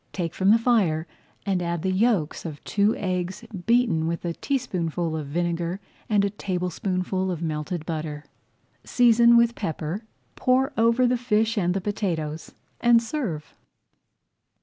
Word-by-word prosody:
Take 170 -4 -3
from 190 +1 +1
the 220 - +7
fire 205 -10 +2 0.4
and 190 -3 0
add 170 -2 -2
the 190 - +1
yolks 190 -5 +1
of 155 -4 -7
two 205 +2 +2
eggs 185 +3 -3 0.2
beaten 230 -9 +3
with 170 +1 -3
a 170 - -1
teaspoonful 175 - -2
of 155 -3 -4
vinegar 170 +3 -2 0.3
and 205 -2 +3
a 200 - -1
tablespoonful 185 0 -2
of 170 -2 -3
melted 155 +1 -3
butter. 155 -2 -4 0.6
Season 235 -1 +5
with 235 0 +4
pepper, 165 -1 -4 0.3
pour 260 +2 +2
over 230 +2 +3
the 250 0 +2
fish 225 -1 +1
and 180 -3 +1
the 195 - -1
potatoes, 165 -6 -3 0.2
and 235 -1 +5
serve. 230 - -4
185 Hz, 145 wpm, -25 LUFS, 165-230 Hz, 0.6 s, the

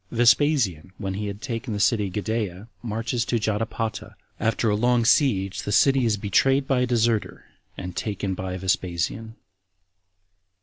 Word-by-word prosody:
Vespasian, 120 - +2
When 95 -2 -4
He 105 +2 -3
Had 100 +1 -7
Taken 115 -2 -4
The 105 - -3
City 105 -1 +2
Gadaea 105 0 -3
Marches 115 +1 -2
To 120 - 0
Jotapata. 110 0 -3 0.2
After 115 0 +1
A - - +2
Long 120 +1 +2
Siege 100 - +2
The 105 - -4
City 135 +4 +4
Is 110 -2 +1
Betrayed 135 +7 +2
By 135 -2 +2
A 125 - +1
Deserter, 115 -2 0 0.3
And 90 0 -6
Taken 100 -2 -2
By 95 0 -4
Vespasian. 95 +4 -2
110 Hz, 145 wpm, -24 LUFS, 100-120 Hz, 0.3 s, City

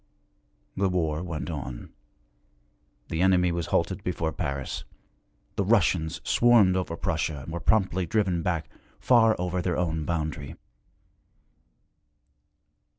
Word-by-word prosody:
The 95 0 +1
war 80 -4 0
went 85 -2 -4
on. 65 -5 -6 1.2
The 80 - -1
enemy 90 -2 +4
was 85 0 -2
halted 85 +3 0
before 85 -3 -1
Paris; 70 -7 -4 0.7
the 100 - +2
Russians 90 -6 +2
swarmed 115 -6 +5
over 90 -3 -2
Prussia 80 -6 -2
and 80 - -8
were 85 - -3
promptly 95 -4 +1
driven 95 -3 +1
back, 85 -2 -1 0.3
far 115 -3 +5
over 90 0 -2
their 90 -1 -1
own 80 -3 -1
boundary. 75 -4 -3
85 Hz, 115 wpm, -27 LUFS, 80-95 Hz, 1.2 s, swarmed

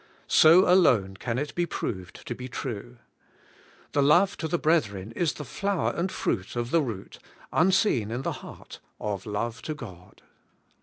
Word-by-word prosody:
So 165 +4 +7
alone 125 - +4
can 115 +2 -3
it 145 +2 -3
be 175 0 0
proved 95 - -5
to - - -3
be 125 +1 -7
true. 120 -1 -6 0.9
The 145 - +2
love 175 +8 +4
to 160 - -3
the 175 - 0
brethren 110 - 0
is 160 +7 0
the 150 - -8
flower 195 - -1
and 180 +3 -1
fruit 95 0 -2
of 120 +1 -2
the 165 - +4
root, 115 -9 -6 0.3
unseen 180 - +3
in 120 +4 -3
the - - -1
heart, - - -11 0.2
of 100 -1 -4
love 115 +2 -3
to 155 - -4
God. 95 -9 -12
125 Hz, 165 wpm, -27 LUFS, 105-165 Hz, 0.9 s, So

